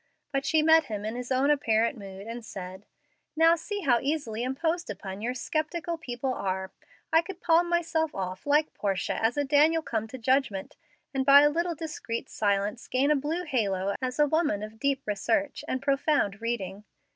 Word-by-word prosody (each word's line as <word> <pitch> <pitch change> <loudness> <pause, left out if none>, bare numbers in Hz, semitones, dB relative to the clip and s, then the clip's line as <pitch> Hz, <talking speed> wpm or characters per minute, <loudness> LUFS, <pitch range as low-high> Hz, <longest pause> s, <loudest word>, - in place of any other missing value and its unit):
But 275 0 -1
she 315 -1 +3
met 320 0 +6
him 210 -4 -5
in 220 +2 -3
his 250 +1 -6
own 265 +3 +3
apparent 230 -3 +2
mood, 195 -2 -9
and 230 +1 -6
said, 190 -1 -8 0.5
"Now 325 +1 +6
see 405 +5 -5
how 250 -8 +3
easily 270 -7 -2
imposed 320 +7 -1
upon 195 0 -6
your 245 +3 -2
sceptical 320 +3 -2
people 260 -4 -3
are! 190 -3 -3 0.4
I 325 - +7
could 375 +1 -9
palm 345 0 +3
myself 325 -2 0
off, 185 +4 -5
like 300 +2 +3
Portia, 195 +1 -2
as 230 +5 +2
a 290 - +2
Daniel 305 +4 +4
come 220 -5 -2
to 260 - -8
judgment, 255 -5 0 0.4
and 270 -1 +1
by 280 +1 +8
a 295 0 +5
little 340 +2 -1
discreet 310 -8 -5
silence 205 +2 -1
gain 270 +3 +2
a - - +5
blue 305 +6 -2
halo 200 - 0
as 255 -1 -2
a 295 - +5
woman 295 -9 +1
of 215 +1 -9
deep 275 +1 0
research 225 +8 -1
and 260 +1 -2
profound 275 -7 +1
reading. 210 -4 -3
265 Hz, 185 wpm, -28 LUFS, 215-310 Hz, 0.5 s, by